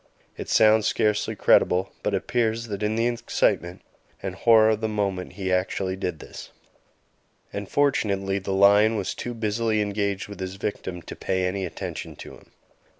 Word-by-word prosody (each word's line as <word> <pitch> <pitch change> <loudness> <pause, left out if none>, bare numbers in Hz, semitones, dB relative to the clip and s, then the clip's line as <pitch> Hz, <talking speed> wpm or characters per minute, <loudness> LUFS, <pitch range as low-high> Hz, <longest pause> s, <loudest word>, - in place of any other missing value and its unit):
It - - -7
sounds 110 0 +5
scarcely 105 -1 0
credible, 90 +2 +3
but - - 0
it - - +3
appears 115 -1 -1
that 100 -1 -4
in 105 +1 0
the 115 +1 +1
excitement 95 -6 0 0.4
and 95 -1 -3
horror 110 +2 +5
of 110 0 -1
the 110 - 0
moment 100 -4 -2
he 95 -2 -2
actually 95 +1 -1
did 90 -3 -3
this, - - -10 1.0
and 100 -1 -5
fortunately 100 -9 +1
the 95 0 -5
lion 100 +3 +5
was 100 -3 -2
too 120 -1 -6
busily 110 0 0
engaged 100 -1 -1
with 100 -1 -10
his 95 0 -5
victim 95 -3 -5
to - - -8
pay 95 -1 -1
any 95 0 -2
attention - - -7
to - - -10
him. - - -17
100 Hz, 170 wpm, -25 LUFS, 95-110 Hz, 1.0 s, sounds